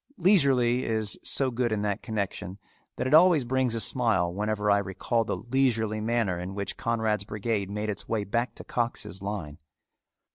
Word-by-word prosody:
"Leisurely" 135 Hz, -, +3 dB
is 110 Hz, -3 st, -1 dB
so 135 Hz, -2 st, +1 dB
good 120 Hz, -1 st, -1 dB
in 105 Hz, -1 st, -1 dB
that 105 Hz, 0 st, -1 dB
connection 100 Hz, -3 st, -4 dB, 0.4 s
that -, -, -3 dB
it 130 Hz, -, 0 dB
always 165 Hz, -2 st, +6 dB
brings 130 Hz, -1 st, 0 dB
a -, -, 0 dB
smile 110 Hz, -8 st, +2 dB
whenever 105 Hz, +1 st, 0 dB
I 100 Hz, -, +4 dB
recall 100 Hz, +4 st, -1 dB
the -, -, -2 dB
"leisurely" 115 Hz, -4 st, 0 dB
manner 110 Hz, -5 st, 0 dB
in 90 Hz, +2 st, -6 dB
which 100 Hz, -1 st, -3 dB
Conrad's 110 Hz, -3 st, -1 dB
brigade 105 Hz, -1 st, -2 dB
made 105 Hz, +1 st, -3 dB
its 100 Hz, -, -8 dB
way 110 Hz, -2 st, 0 dB
back 120 Hz, +5 st, -2 dB
to -, -, -10 dB
Cox's 110 Hz, -5 st, -3 dB
line. 95 Hz, -8 st, -5 dB
110 Hz, 175 wpm, -27 LUFS, 100-120 Hz, 0.4 s, always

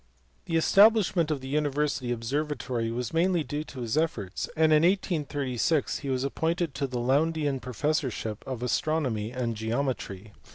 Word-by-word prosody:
The 165 Hz, -, -2 dB
establishment 195 Hz, -1 st, +5 dB
of 150 Hz, -4 st, -1 dB
the 130 Hz, -, -7 dB
university 145 Hz, -3 st, 0 dB
observatory 125 Hz, -1 st, -2 dB
was 120 Hz, +2 st, -3 dB
mainly 175 Hz, 0 st, +2 dB
due 150 Hz, +1 st, -4 dB
to 130 Hz, -4 st, -8 dB
his 115 Hz, +1 st, -2 dB
efforts, 115 Hz, -, -1 dB
and 160 Hz, -1 st, +5 dB
in 150 Hz, -, +6 dB
1836 150 Hz, -, 0 dB
he 140 Hz, -, -5 dB
was 130 Hz, -1 st, 0 dB
appointed 160 Hz, +3 st, -1 dB
to 140 Hz, -, -2 dB
the 125 Hz, -1 st, -4 dB
Lowndean 145 Hz, +3 st, +1 dB
professorship 125 Hz, -4 st, -2 dB
of 130 Hz, -2 st, -4 dB
astronomy 125 Hz, -5 st, 0 dB
and 120 Hz, -2 st, -2 dB
geometry. 110 Hz, -3 st, -3 dB
140 Hz, 150 wpm, -28 LUFS, 120-155 Hz, -, in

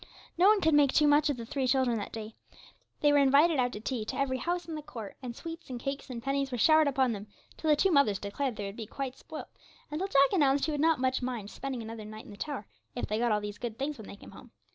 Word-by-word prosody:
No 360 Hz, +3 st, +5 dB
one 420 Hz, -1 st, +5 dB
could 320 Hz, -2 st, +3 dB
make 290 Hz, -2 st, +5 dB
too 300 Hz, -, +5 dB
much 295 Hz, +1 st, +4 dB
of 285 Hz, -, -1 dB
the 230 Hz, -, -6 dB
three 270 Hz, +1 st, -1 dB
children 250 Hz, -3 st, +2 dB
that 205 Hz, -, -6 dB
day. 220 Hz, 0 st, -7 dB, 0.7 s
They 295 Hz, -, +5 dB
were 290 Hz, -, +5 dB
invited 280 Hz, +3 st, +5 dB
out 245 Hz, -1 st, +2 dB
to -, -, -5 dB
tea 230 Hz, +1 st, -3 dB
to -, -, -4 dB
every 265 Hz, -2 st, 0 dB
house 345 Hz, +1 st, -2 dB
in 330 Hz, -, -5 dB
the 305 Hz, -, -4 dB
court, 230 Hz, -8 st, -8 dB
and 245 Hz, -3 st, -6 dB
sweets, 330 Hz, +2 st, -8 dB
and 250 Hz, -2 st, -5 dB
cakes, 275 Hz, +2 st, -4 dB
and 235 Hz, -2 st, -6 dB
pennies 275 Hz, 0 st, -1 dB
were 245 Hz, -, -2 dB
showered 310 Hz, +5 st, +5 dB
upon 265 Hz, -3 st, +2 dB
them, 205 Hz, -1 st, -6 dB, 0.3 s
till 315 Hz, -, -2 dB
the 300 Hz, -, +6 dB
two 385 Hz, +6 st, +2 dB
mothers 280 Hz, -, +4 dB
declared 230 Hz, +6 st, -3 dB
they 205 Hz, -, -4 dB
would 195 Hz, 0 st, -6 dB
be 220 Hz, -2 st, -6 dB
quite 265 Hz, +2 st, -5 dB
spoilt, 315 Hz, -, -8 dB, 0.4 s
and 300 Hz, +3 st, -3 dB
till 385 Hz, -, 0 dB
Jack 275 Hz, -1 st, +4 dB
announced 280 Hz, -6 st, +3 dB
he 315 Hz, -, -1 dB
would 295 Hz, -1 st, -1 dB
not 320 Hz, -2 st, +3 dB
much 260 Hz, 0 st, +1 dB
mind 240 Hz, -5 st, -4 dB
spending 265 Hz, -4 st, -5 dB
another 225 Hz, 0 st, -7 dB
night 215 Hz, +1 st, -9 dB
in -, -, -12 dB
the 205 Hz, -, -11 dB
tower, 280 Hz, -6 st, -4 dB, 0.3 s
if 245 Hz, -, -2 dB
they 215 Hz, +1 st, -2 dB
got 240 Hz, -1 st, +2 dB
all 210 Hz, 0 st, +2 dB
these 205 Hz, 0 st, -6 dB
good 235 Hz, -2 st, -5 dB
things 280 Hz, 0 st, -3 dB
when 215 Hz, -, -9 dB
they -, -, -9 dB
came -, -, -13 dB
home. -, -, -13 dB
265 Hz, 285 wpm, -30 LUFS, 230-295 Hz, 0.7 s, the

